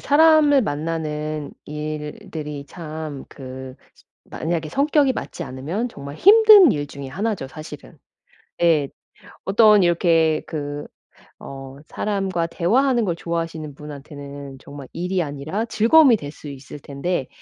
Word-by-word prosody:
사람을 295 -2 +5
만나는 155 -2 -3
일들이 150 -1 -6
참 155 -3 -7
그 130 -1 -9 0.5
만약에 160 -1 -3
성격이 280 - +2
맞지 - - -6
않으면 160 - -4
정말 140 -7 -9
힘든 415 - +8
일 145 -1 -3
중에 140 -1 -9
하나죠, 190 -1 -3
사실은. 155 0 -11 0.6
예. 155 -5 +3 0.6
어떤 210 0 +5
이렇게 165 -2 +3
그 145 -2 -5 0.5
어, 135 0 -9
사람과 195 -5 -2
대화하는 240 +9 +2
걸 175 - -1
좋아하시는 165 -3 -4
분한테는 140 -1 -9
정말 140 -2 -10
일이 180 +1 -1
아니라 150 +9 -4
즐거움이 235 +3 +5
될 145 -3 -7
수 150 - -11
있을 140 +1 -10
텐데 140 +2 -3
160 Hz, 265 characters per minute, -22 LUFS, 145-205 Hz, 0.6 s, 힘든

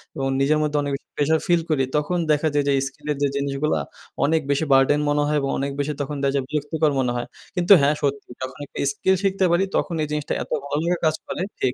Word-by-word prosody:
এবং 135 -2 -1
নিজের 150 +3 +3
মধ্যে 150 -1 0
অনেক 145 - -2
বেশি - - -11
প্রেশার 155 +2 +2
ফিল 175 -2 +3
করি 145 -4 +2
তখন 150 +4 0
দেখা 150 +1 +2
যায় 145 - +2
যে 140 - +3
স্কিলের 145 +1 -5
যে - - +4
জিনিসগুলা 140 - 0 0.5
অনেক 160 +2 +2
বেশি 145 +3 +1
বার্ডেন 135 +2 +4
মনে 145 0 +2
হয়। 150 0 +1
এবং 135 - -1
অনেক 140 +1 -2
বেশি 145 +1 0
তখন 145 +1 -3
দেখা 135 - +2
যায় 140 - +1
বিরক্তিকর 150 +1 0
মনে 125 -2 +1
হয়। 120 - -3 0.3
কিন্তু 180 +2 +6
হ্যাঁ 145 +2 +3
সত্যি 140 -2 -2
যখন 130 0 -5
একটা - - -14
স্কিল 190 +6 +1
শিখতে 195 -1 +2
পারি 175 +3 +3
তখন 175 - 0
এই - - -2
জিনিসটা 150 -1 -2
এত - - -17
ভালো 145 +1 -1
লাগা 175 +1 +1
কাজ 155 -1 +3
করে - - -4 0.2
ঠিক 125 - +1
145 Hz, 235 wpm, -23 LUFS, 140-155 Hz, 0.5 s, কিন্তু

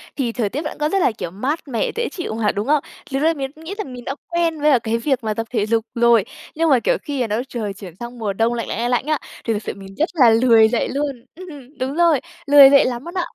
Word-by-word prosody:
thì 255 -5 -1
thời 225 -3 -1
tiết 280 +8 -3
vẫn 300 - -6
có 300 0 0
rất 390 - +1
là, - - +3
kiểu, 175 -5 -6
mát 260 - -2
mẻ, 235 -5 -1
dễ 470 +1 -1
chịu 350 - -5
mà, 220 -1 0
đúng 205 +4 -4
không? 295 -1 +2 0.3
Lúc 270 +1 -1
đấy 325 +1 +4
mình 270 -3 -5
cũng 315 - -15
nghĩ 340 +5 -6
rằng 280 -12 -6
mình 245 -1 -9
đã 275 - -3
quen 335 -3 0
với 300 +1 +4
cả 260 - +5
cái 230 0 -1
việc 265 +1 -1
mà 215 -1 -1
tập 225 +1 -4
thể 220 -4 0
dục 225 0 0
rồi, 235 -3 +4 0.3
nhưng 325 +1 +1
mà, 265 -4 +5
kiểu, - - +1
khi 275 -6 -2
nó 210 - -1
trời 215 -5 -4
chuyển 195 -3 -11
sang 240 0 -8
mùa 210 -3 -2
đông 225 +4 +1
lạnh, 230 -4 -3
lạnh, - - -4
lạnh, 240 +1 0
lạnh 245 +1 +1
á, 305 0 +1 0.3
thì 230 - +1
thực 210 0 -4
sự - - -4
mình 195 0 -12
rất 315 - +1
là 265 -9 +6
lười 225 -1 +5
dậy 235 - 0
luôn. 275 -4 -3
Ừm, 295 -6 -12
đúng 265 +2 -2
rồi, 335 -5 +3 0.3
lười 280 -1 +9
dậy 280 0 +6
lắm 245 0 -3
luôn 340 - -7
ạ. 360 -2 0
255 Hz, 290 wpm, -20 LUFS, 225-300 Hz, 0.3 s, lười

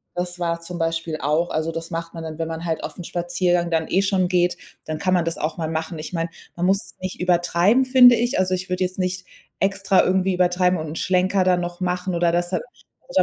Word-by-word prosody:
das 180 0 -4
war 170 -1 -1
zum 170 +1 -7
Beispiel 165 -1 -2
auch 155 +5 +1
also, 160 +1 -1
das 165 +1 -6
macht 165 0 -5
man 165 - -6
dann, 160 0 -7
wenn 165 - -1
man 165 +1 -5
halt 160 -1 -2
auf'n 180 - -6
Spaziergang 175 0 0
dann, 160 -1 0
eh, 190 - +2
schon 190 -2 +1
geht, 175 -1 +1 0.3
dann 155 0 -3
kann 185 +3 0
man 175 -2 +2
das 165 - -2
auch 155 +2 -3
mal 160 -2 -2
machen. 160 +1 -3
Ich 155 - -6
meine, 165 -1 -2 0.3
man 175 +1 -1
muss 195 +1 +4
es - - -16
nicht 185 0 -5
übertreiben, 180 +7 +3
finde 255 -2 +8
ich. 240 +1 0
Also, 185 0 +2
ich 185 0 -5
würde 180 0 0
jetzt 185 0 -3
nicht 185 0 -2 0.3
extra 195 -1 +3
irgendwie 190 0 +2
übertreiben 180 0 +2
und 155 - -5
'n 155 - -6
Schlenker 185 +2 +2
dann 180 -1 +3
noch 175 +1 -6
machen 180 0 -1
oder 170 0 +2
das 175 0 0
da - - 0 0.5
Also, - - +4
175 Hz, 240 wpm, -22 LUFS, 165-185 Hz, 0.5 s, finde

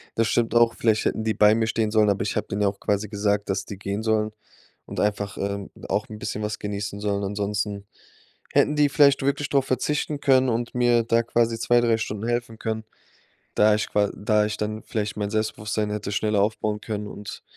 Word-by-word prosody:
Das 115 0 +2
stimmt 120 0 +1
auch, 120 0 +5
vielleicht 110 -2 +1
hätten 110 - 0
die 110 0 0
bei 105 0 +6
mir 110 0 +1
stehen 110 -2 0
sollen, 110 -1 +4
aber 100 -1 +1
ich 100 - -2
habe - - -1
denen 100 +1 -1
ja - - +4
auch 100 0 -3
quasi 105 0 -1
gesagt, 100 0 0
dass 95 0 -1
die 100 - -8
gehen 100 +2 -3
sollen 110 -1 +1 0.5
und - - -6
einfach 100 0 -1
ähm, 100 0 -3
und - - -11
auch - - 0
'n 110 - -7
bisschen 105 - -4
was 105 +1 -2
genießen 100 0 -4
sollen. 100 -1 -1
Ansonsten 100 0 -2 0.7
hätten 150 - +3
die 150 -1 +4
vielleicht 140 -2 +4
wirklich 140 +1 0
drauf 140 -2 +2
verzichten 145 +3 -1
können 130 -2 +4
und 120 +1 -2
mir 120 -1 +4
da 115 +1 +2
quasi 115 0 +1
2,, 120 +1 +3
3 115 -1 +2
Stunden 110 0 -4
helfen 120 -2 -2
können, 110 0 -3 0.7
da 105 0 +5
ich 105 - -1
qua 105 -1 +2
da 105 +1 +2
ich 105 0 -3
dann 110 +1 -3
vielleicht 105 -2 -3
mein 105 -1 -2
Selbstbewusstsein 105 0 -2
hätte 105 -1 -3
schneller 105 0 +1
aufbauen 105 0 -1
können 105 -2 -4
und 105 0 -8
105 Hz, 215 wpm, -24 LUFS, 105-115 Hz, 0.7 s, bei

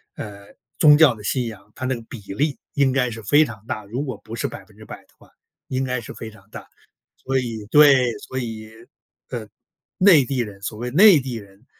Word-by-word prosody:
呃， 100 -1 -10 0.2
宗 150 -1 +7
教 150 -5 +6
的 105 - -13
信 125 +3 -1
仰， 105 -2 -11
它 130 - -5
那 130 0 0
个 120 - -8
比 115 +1 -10 0.2
例 145 +5 0 0.2
应 140 -2 +3
该 130 -2 +1
是 115 -1 -8
非 145 +9 +5
常 110 -7 -8
大。 110 -3 -5
如 120 +8 -4
果 130 -5 -5
不 110 +1 -8
是 115 - -2
100% - - -11
的 - - -31
话， - - -22 0.4
应 130 0 -1
该 125 -1 -2
是 115 - -9
非 110 - -8
常 105 -2 -19
大。 - - -10 0.5
所 135 0 -2
以 115 -4 -5
对， 135 -5 +6
所 130 - -8
以， 110 -3 -5 0.6
呃， 115 -4 -6 0.5
内 185 -7 +6
地 130 0 -3
人 105 -4 -5
所 105 +1 -5
谓 120 +2 -5
内 185 - +7
地 130 -2 -5
人 100 0 -12
120 Hz, 220 characters per minute, -22 LUFS, 110-135 Hz, 0.6 s, 宗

